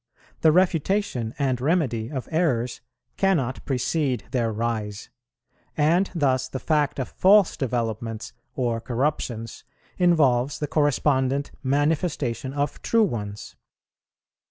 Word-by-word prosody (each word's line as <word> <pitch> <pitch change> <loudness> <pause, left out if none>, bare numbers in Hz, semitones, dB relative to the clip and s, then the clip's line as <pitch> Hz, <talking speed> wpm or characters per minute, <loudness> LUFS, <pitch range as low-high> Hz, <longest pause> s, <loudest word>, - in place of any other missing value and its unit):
The 160 - +5
refutation 175 - +1
and 130 -3 0
remedy 130 -8 0
of 130 -4 -4
errors 130 -8 0 0.4
cannot 155 -10 +1
precede 130 -1 0
their 120 -3 0
rise; 110 -2 -3 0.7
and 165 +6 +3
thus 130 -5 +1
the 130 - -5
fact 150 0 0
of 130 - -2
false 200 0 +4
developments 115 -3 -3 0.2
or 120 -3 -1
corruptions 120 -2 -2 0.4
involves 145 -7 +3
the 150 - -2
correspondent 140 -2 +1
manifestation 145 -2 0
of 145 0 -2
true 230 -1 +3
ones. 105 - -4
135 Hz, 110 wpm, -24 LUFS, 120-155 Hz, 0.7 s, The